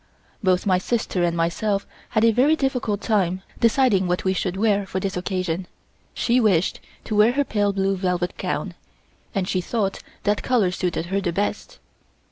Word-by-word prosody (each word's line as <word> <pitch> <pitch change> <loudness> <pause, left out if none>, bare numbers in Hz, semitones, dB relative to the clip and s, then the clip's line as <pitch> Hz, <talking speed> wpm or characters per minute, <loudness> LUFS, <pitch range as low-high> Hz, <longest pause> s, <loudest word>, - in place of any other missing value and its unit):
Both 185 -3 +2
my 185 -2 +3
sister 195 -3 -1
and 170 -1 +1
myself 195 +5 0 0.2
had 215 0 +2
a 230 - +6
very 270 +8 +4
difficult 250 -8 -1
time 190 -4 0 0.2
deciding 230 -5 +3
what 180 0 0
we 190 - +1
should 185 0 -2
wear 205 -1 +2
for 190 - -2
this 195 0 -3
occasion; 180 -1 -2 0.5
she 245 +1 +2
wished 190 -7 +2 0.2
to 215 - -3
wear 215 +3 +5
her 285 +2 +2
pale 205 -6 0
blue 195 0 0
velvet 180 -1 -1
gown, - - -3 0.6
as 190 -2 0
she 185 - 0
thought 195 +1 -1 0.2
that 205 0 +1
color 225 -8 +2
suited 180 -2 -2
her 195 +3 -1
the 180 -3 -1
best. 205 - -3
195 Hz, 175 wpm, -23 LUFS, 180-220 Hz, 0.6 s, a